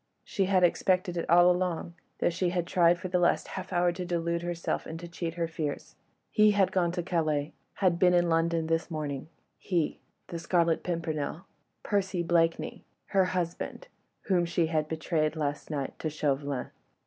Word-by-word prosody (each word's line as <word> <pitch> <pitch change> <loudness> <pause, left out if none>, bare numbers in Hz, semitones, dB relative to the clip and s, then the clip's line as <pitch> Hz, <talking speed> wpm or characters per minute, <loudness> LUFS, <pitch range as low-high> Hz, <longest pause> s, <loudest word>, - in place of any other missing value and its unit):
She 195 - 0
had 185 -1 +3
expected 180 0 +2
it 170 - -3
all 175 +2 +7
along, 180 -2 -1 0.2
though - - +1
she 175 +1 0
had 175 -1 -1
tried 175 -1 +4
for 185 +1 -5
the 180 0 +1
last 175 - +2
half 185 0 -6
hour 175 -1 +3
to 180 +1 -5
delude 170 -1 -1
herself 175 -1 -3
and 160 +1 -6
to 175 - -7
cheat 170 -1 -4
her 170 -1 -1
fears. 155 -3 -4 0.4
He 215 -1 +5
had 200 -2 +3
gone 175 -2 +1
to 175 -1 -2
Calais, 155 -4 0 0.2
had 180 -4 +2
been 180 -1 +5
in 175 0 +3
London 165 0 +1
this 165 +1 0
morning... 150 -2 -4 0.3
he... 170 -5 -1 0.3
the 170 - -6
Scarlet 170 -1 +2
Pimpernel... 165 0 -3 0.4
Percy 190 -4 0
Blakeney... 165 -1 +1 0.3
her 195 -2 +3
husband... 180 - -3 0.3
whom 180 -3 +2
she 170 0 +1
had 155 -1 0
betrayed 155 0 -1
last 145 -2 -3
night 140 -3 -4
to 155 - -2
Chauvelin. 145 -3 -2
170 Hz, 175 wpm, -29 LUFS, 160-180 Hz, 0.4 s, all